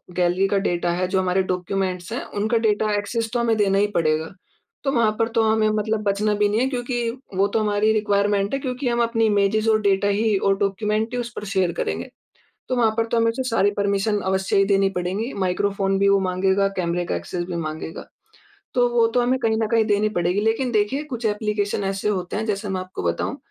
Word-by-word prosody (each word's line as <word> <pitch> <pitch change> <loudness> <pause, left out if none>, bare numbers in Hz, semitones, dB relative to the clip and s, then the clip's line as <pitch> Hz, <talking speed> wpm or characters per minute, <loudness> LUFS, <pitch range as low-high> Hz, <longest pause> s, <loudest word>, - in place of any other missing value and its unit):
Gallery 180 +2 +2
का 200 - +1
data 175 0 0
है 180 +1 -1
जो 190 0 0
हमारे 185 +1 +1
डॉक्यूमेंट्स 185 +1 -3
हैं 245 - -3 0.2
उनका 220 +2 +1
डेटा 215 0 +2
एक्सेस 225 +2 -2
तो 240 - +1
हमें 230 -1 +2
देना 195 -2 +2
ही 205 +1 +3
पड़ेगा। 160 -1 +1 0.5
तो 275 - +1
वहाँ 230 -5 +3
पर 225 - +2
तो 225 - +4
हमें 220 0 +2
मतलब 215 0 -1
बचना 210 +1 +1
भी 205 0 +2
नहीं 215 +2 +1
है 260 - +2
क्योंकि, 240 -2 -2 0.3
वो 195 +1 +3
तो 220 - 0
हमारी 210 0 +2
रिक्वायरमेंट 205 -1 +1
है 275 - 0
क्योंकि 255 0 -3
हम 235 0 +1
अपनी 230 -1 +1
इमेजेस 215 +1 +2
और 215 0 +3
डेटा 200 0 +2
ही 205 0 +2
और 195 0 +1
डॉक्यूमेंट 210 +3 -1
ही 245 - -1
उस 240 0 -4
पर 210 - -6
शेयर 190 -3 0
करेंगे। - - -3 0.6
तो 255 - +1
वहाँ 225 -2 +3
पर 225 - +2
तो 235 - +2
हमें 230 0 +3
सारी 225 -6 +1
परमिशन 200 +1 +1
अवश्य 190 +1 0
ही 195 - +4
देनी 195 -1 +3
पड़ेगी। 195 +8 -2
माइक्रोफ़ोन 195 +1 0
भी 200 - +3
वो 200 0 +4
माँगेगा, 190 +1 +1
कैमरे 175 0 -1
का - - -2
एक्सेस 85 - -4
भी 175 -1 -5
माँगेगा। 160 0 -5 0.7
तो 245 -1 +4
वो 235 -1 +3
तो 245 - +4
हमें 255 +2 +1
कहीं 220 -3 +1
न 220 -1 0
कहीं 225 0 +2
देनी 210 0 +2
पड़ेगी 180 +4 +1
लेकिन 225 +3 0
देखिए 215 +7 0
कुछ 245 -5 -5
एप्लीकेशन 210 -1 -1
ऐसे 195 +2 -1
होते 185 -3 -2
हैं 220 - -2
जैसे 205 -1 -2
मैं 190 -1 -2
आपको 185 - -7
बताऊँ। 85 -1 -1
205 Hz, 220 wpm, -22 LUFS, 195-225 Hz, 0.7 s, तो